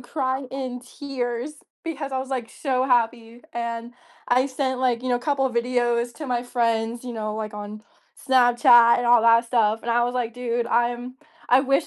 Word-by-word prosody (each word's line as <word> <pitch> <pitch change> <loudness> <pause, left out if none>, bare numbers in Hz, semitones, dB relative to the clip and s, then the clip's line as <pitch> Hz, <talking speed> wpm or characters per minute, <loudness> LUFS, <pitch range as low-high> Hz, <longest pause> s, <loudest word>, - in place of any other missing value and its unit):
cry 260 +1 -2
in 255 -2 -5
tears 250 +1 -5 0.3
because 295 -4 -4
I 260 - -2
was 265 0 -5
like 250 -4 -4
so 260 -3 -1
happy, 235 -1 0
and 235 0 -4 0.3
I 255 +2 +3
sent 260 -1 -2
like, 245 -2 +1
you 255 - -3
know, 245 - +2
a - - -4
couple 280 -2 0
of 245 - -5
videos 240 0 0
to 300 +2 -7
my 245 -1 -1
friends, 230 -1 -1
you 245 - -5
know, 215 -1 -4
like 215 -1 -5
on 210 +1 -8 0.5
Snapchat 240 -2 +6
and 245 - -1
all 240 -1 +5
that 230 0 +5
stuff, 225 -2 +1
and 235 - -3
I 240 +1 +3
was 245 - -3
like, 240 -2 -2
dude, 240 -1 -2
I'm, 240 +1 -1 0.3
I 255 +2 +6
wish 275 0 +1
245 Hz, 195 wpm, -23 LUFS, 235-260 Hz, 0.5 s, Snapchat